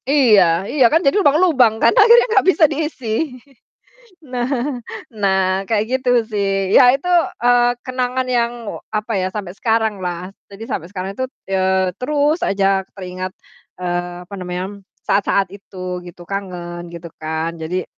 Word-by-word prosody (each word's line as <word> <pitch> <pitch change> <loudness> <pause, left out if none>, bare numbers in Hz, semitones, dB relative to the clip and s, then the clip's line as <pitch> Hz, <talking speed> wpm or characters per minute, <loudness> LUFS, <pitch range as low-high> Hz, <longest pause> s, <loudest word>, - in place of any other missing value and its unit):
Iya 205 - +4
iya 265 -5 +4
kan 325 - +4
jadi 275 - +3
lubang-lubang 290 - +4
kan 230 - +5
akhirnya 470 +3 +7
nggak 395 -4 +3
bisa 335 - +3
diisi. 300 -4 -4 1.2
Nah 255 0 -2 0.3
nah 190 -2 +1
kayak 220 -2 +1 0.2
gitu 255 -1 0 0.2
sih. 195 -3 -1
Ya 250 0 +8
itu, 320 +6 -7 0.4
eee, 245 0 +4
kenangan 255 0 -2
yang 240 -1 +1 0.4
apa 215 +1 -2
ya 185 - -1
sampai 195 -4 -5
sekarang 220 -2 0
lah. 180 +1 -4 0.2
Jadi 200 +3 -9
sampai 170 -1 -4
sekarang 190 0 -5
itu, 260 - -1 0.2
eee, 190 -1 +1
terus 295 +4 +1
aja 195 -1 +1
teringat, 185 -1 -6 0.5
eee, 175 0 -3
apa 200 - -9
namanya 180 -1 -4 0.4
saat-saat 200 -1 +2
itu 185 -2 -7
gitu 175 0 -11
kangen 175 -3 -5
gitu 170 0 -8
kan. 160 +1 -3
Jadi 165 +3 -3
200 Hz, 145 wpm, -19 LUFS, 185-250 Hz, 1.2 s, Ya